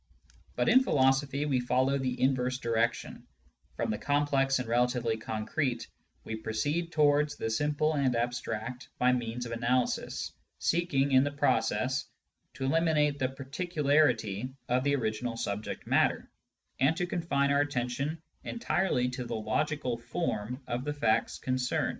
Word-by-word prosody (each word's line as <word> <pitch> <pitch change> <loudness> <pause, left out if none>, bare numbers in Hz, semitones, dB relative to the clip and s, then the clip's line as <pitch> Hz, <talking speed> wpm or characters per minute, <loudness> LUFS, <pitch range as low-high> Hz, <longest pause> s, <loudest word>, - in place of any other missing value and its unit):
But - - +1
in 250 +3 +7
philosophy 140 - +2
we 135 -4 +1
follow 130 +3 +1
the 130 -1 -2
inverse 130 -1 +1
direction: 115 -1 -1 0.5
from - - -1
the 105 - -3
complex 140 -2 +2
and 125 -2 -3
relatively 120 -1 +1
concrete 115 +4 -2 0.4
we 110 - -4
proceed 145 +11 -2
towards 150 -1 +3
the 115 - -3
simple 150 +5 +1
and 135 -4 +1
abstract 120 0 -3
by 125 0 +4
means 120 0 -2
of 115 - -6
analysis, 120 +2 0 0.3
seeking, 150 -5 +1
in 130 0 +6
the 145 - 0
process, 130 -2 +1 0.5
to 135 - -3
eliminate 150 -1 +2
the 130 -1 +1
particularity 135 - 0
of 125 +1 +1
the 140 0 +2
original 115 -1 -2
subject 100 -1 -4
matter, - - +1 0.5
and 140 +5 +3
to 175 - 0
confine 165 -6 0
our 140 0 +4
attention 140 +2 -2 0.2
entirely 190 - 0
to 125 0 -5
the 120 -1 -4
logical 125 +3 -1
/^rw 120 -3 -3
of 120 +1 -2
the 145 +1 -2
facts 115 -6 +1
concerned. 130 -1 0
130 Hz, 140 wpm, -30 LUFS, 120-145 Hz, 0.5 s, in